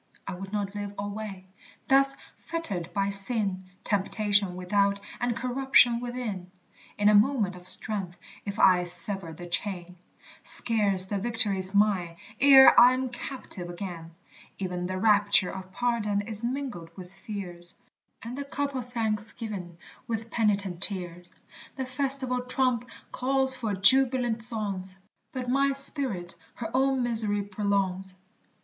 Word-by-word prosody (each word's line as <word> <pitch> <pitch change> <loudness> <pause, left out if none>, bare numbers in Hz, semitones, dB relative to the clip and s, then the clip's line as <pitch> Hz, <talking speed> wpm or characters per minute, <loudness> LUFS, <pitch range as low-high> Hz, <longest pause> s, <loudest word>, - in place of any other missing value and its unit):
I 195 - -5
would 190 +2 -8
not 205 -2 -3
live 205 -1 -6
alway 205 -2 -6 0.4
thus 275 0 +4 0.2
fettered 200 - -5
by 200 -1 -1
sin, 200 -2 -2 0.2
Temptation 205 -1 0
without 200 +2 0 0.2
and 245 -1 -1
corruption 250 -2 +3
within; 240 -7 -5 0.5
In 205 - +2
a 210 - +6
moment 210 -3 +2
of 180 0 -9
strength 195 -5 +1 0.3
if 200 -1 -6
I 180 -2 +4
sever 175 0 -2
the 175 +2 -10
chain, 180 0 -4 0.4
Scarce 205 -5 +4
the 200 +1 -3
victory's 205 -4 -1
mine, 195 -5 +1 0.2
ere 270 0 +8
I'm 255 +1 +5
captive 240 -7 -7
again; 170 -2 -8 0.4
E'en 180 -2 -3
the 185 0 -4
rapture 205 -2 +3
of 190 -1 -9
pardon 215 -3 -1
is 215 +1 -5
mingled 245 -9 -4
with 185 0 -11
fears, 185 -4 -7 0.5
And 235 +2 -7
the 280 +1 -5
cup 280 0 -3
of 250 -2 -6
thanksgiving 215 -5 -4 0.3
with 225 0 -4
penitent 200 -5 -1
tears: 180 -3 -2 0.4
The 265 - -4
festival 260 -1 -2
trump 250 -1 -1 0.2
calls 265 0 0
for 225 -5 -3
jubilant 245 +2 +3
songs, 195 -5 +6 0.3
But 255 -2 -5
my 275 +2 +2
spirit 265 - +1 0.2
her 225 -2 -6
own 265 -1 +1
miserere 220 -4 0
prolongs. 195 -2 -2
205 Hz, 130 wpm, -27 LUFS, 190-245 Hz, 0.5 s, ere